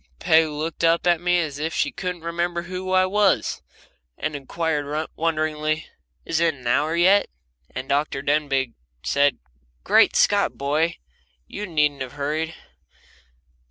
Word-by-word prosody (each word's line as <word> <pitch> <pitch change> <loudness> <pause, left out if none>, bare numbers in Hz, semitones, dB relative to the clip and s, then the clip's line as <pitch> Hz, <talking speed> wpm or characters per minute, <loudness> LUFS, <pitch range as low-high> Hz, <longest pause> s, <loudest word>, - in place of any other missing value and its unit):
Peg 160 - +4
looked 155 +2 -4
up 165 +1 +3
at 175 -2 +3
me 180 0 +2
as 150 -4 -2
if 160 +2 -2
she - - +1
couldn't 180 -3 -5
remember 170 +1 -2
who 185 +1 -5
I 185 0 +4
was, 200 +1 +1 0.6
and 155 -1 -3
inquired, 150 +1 -2
wonderingly: 155 -1 -1 0.4
"Is 160 - 0
it 165 -2 +2
an 130 -3 -16
hour 150 +7 +1
yet?" 190 +4 +4 0.4
And 130 0 -6
Dr. 140 0 0
Denbigh 140 -4 0 0.3
said, 140 0 +2 0.5
"Great - - +4
Scott! - - +3
boy, 150 +4 0 0.5
you 210 +1 -6
needn't 150 -4 +1
have 130 0 -5
hurried!" 155 +3 -2
160 Hz, 140 wpm, -23 LUFS, 145-170 Hz, 0.6 s, Peg